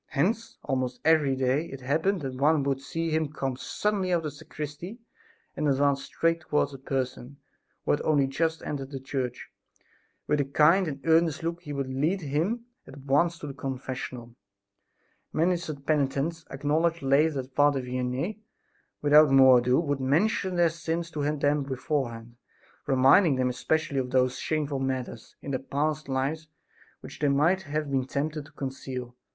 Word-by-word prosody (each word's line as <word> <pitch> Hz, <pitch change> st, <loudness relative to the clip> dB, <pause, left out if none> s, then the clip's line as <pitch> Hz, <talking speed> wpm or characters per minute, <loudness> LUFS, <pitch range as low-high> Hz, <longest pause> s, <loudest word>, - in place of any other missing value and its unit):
Hence 220 Hz, +11 st, -1 dB
almost 130 Hz, -2 st, -2 dB
every 155 Hz, -4 st, +4 dB
day 130 Hz, +4 st, +1 dB
it 135 Hz, 0 st, -9 dB
happened 160 Hz, +8 st, 0 dB
that 135 Hz, -2 st, -4 dB
one 145 Hz, +3 st, +2 dB
would 135 Hz, -1 st, -1 dB
see 165 Hz, +3 st, -3 dB
him 155 Hz, -2 st, 0 dB
come 135 Hz, -4 st, -3 dB
suddenly 195 Hz, +6 st, -1 dB
out 175 Hz, -, +4 dB
of 165 Hz, -, -5 dB
the 150 Hz, -, -3 dB
sacristy 150 Hz, -, -7 dB, 0.6 s
and 150 Hz, -, -1 dB
advance 140 Hz, 0 st, +2 dB
straight 165 Hz, 0 st, 0 dB
towards 150 Hz, -2 st, 0 dB
a 135 Hz, -, -9 dB
person 130 Hz, 0 st, -4 dB, 0.5 s
who -, -, +2 dB
had -, -, +1 dB
only 145 Hz, -3 st, +3 dB
just 160 Hz, +4 st, -1 dB
entered 135 Hz, -2 st, -4 dB
the 135 Hz, -2 st, -6 dB
church. 130 Hz, -2 st, -4 dB, 0.7 s
With 150 Hz, -1 st, +1 dB
a -, -, -1 dB
kind 155 Hz, +7 st, +4 dB
and 140 Hz, -2 st, -5 dB
earnest 165 Hz, -1 st, +3 dB
look 170 Hz, +1 st, -3 dB
he 150 Hz, -4 st, -8 dB
would 140 Hz, -2 st, -2 dB
lead 160 Hz, +9 st, 0 dB
him 170 Hz, -, -1 dB, 0.2 s
at 140 Hz, -, -11 dB
once 145 Hz, +5 st, +1 dB
to 150 Hz, -, -7 dB
his 140 Hz, -, -7 dB
confessional. 130 Hz, -2 st, -5 dB, 1.0 s
Many 175 Hz, +3 st, +2 dB
such 155 Hz, -5 st, -6 dB
penitents 150 Hz, +2 st, 0 dB
acknowledged 155 Hz, +4 st, 0 dB
later 140 Hz, +1 st, +3 dB
that 130 Hz, +1 st, -18 dB
Father 145 Hz, -2 st, +3 dB
Vianney, 125 Hz, +10 st, -3 dB, 0.6 s
without 150 Hz, +1 st, +7 dB
more 130 Hz, -2 st, +7 dB
ado, 125 Hz, +2 st, +2 dB
would 145 Hz, -4 st, -1 dB
mention 180 Hz, -, +1 dB
their 175 Hz, -1 st, +4 dB
sins 170 Hz, +1 st, -3 dB
to 150 Hz, -, -4 dB, 0.2 s
them 145 Hz, +1 st, +2 dB
beforehand, 125 Hz, -4 st, -3 dB, 0.5 s
reminding 135 Hz, +4 st, +5 dB
them 130 Hz, -1 st, +1 dB
especially 140 Hz, +3 st, -1 dB
of 125 Hz, -1 st, -2 dB
those 130 Hz, 0 st, +1 dB
shameful 150 Hz, -3 st, -1 dB
matters 130 Hz, -3 st, -4 dB
in 140 Hz, -, -5 dB
their 130 Hz, -, -1 dB
past 150 Hz, +3 st, -2 dB
life 140 Hz, +4 st, -1 dB, 0.5 s
which -, -, -11 dB
they 150 Hz, -, +2 dB
might 155 Hz, +7 st, +3 dB
have 150 Hz, -3 st, -3 dB
been 130 Hz, -2 st, +1 dB
tempted 150 Hz, +2 st, -3 dB
to -, -, -19 dB
conceal. 130 Hz, -2 st, -6 dB
145 Hz, 170 wpm, -27 LUFS, 135-160 Hz, 1.0 s, without